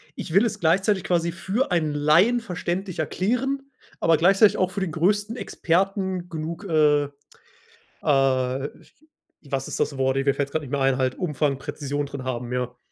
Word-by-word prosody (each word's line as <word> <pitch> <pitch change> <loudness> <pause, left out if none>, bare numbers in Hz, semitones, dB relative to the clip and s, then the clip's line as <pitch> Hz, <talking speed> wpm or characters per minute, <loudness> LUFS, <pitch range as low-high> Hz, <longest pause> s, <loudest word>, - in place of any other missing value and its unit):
Ich 160 - -6
will 200 +5 +5
es 225 - -2
gleichzeitig 190 +3 +2
quasi 170 -2 +1
für 195 +9 -2
einen 155 -4 +1
Laien 165 +12 +4
verständlich 180 -3 -4
erklären, 255 - -1 0.3
aber 165 -1 +4
gleichzeitig 195 +5 +5
auch 185 0 +1
für 200 - -4
den 185 - -1
größten 205 +7 +1
Experten 190 -3 -1
genug, 165 +5 -5
äh, 150 -3 +3 1.0
äh 135 -1 +1 0.8
was 135 -1 -2
ist - - -5
das 140 - -1
Wort? 130 0 +1
Äh, 135 - +1
mir 140 -1 +3
fällt 140 -1 -2
gerade 160 - -2
nicht 130 - -10
mehr 140 -1 -1
ein 135 -1 +3
halt 130 -1 0
Umfang, 145 -5 0
Präzision 145 0 -3
drin 140 -2 -7
haben, 125 -1 -4
ja. 125 -1 -3
160 Hz, 170 wpm, -24 LUFS, 140-190 Hz, 1.0 s, will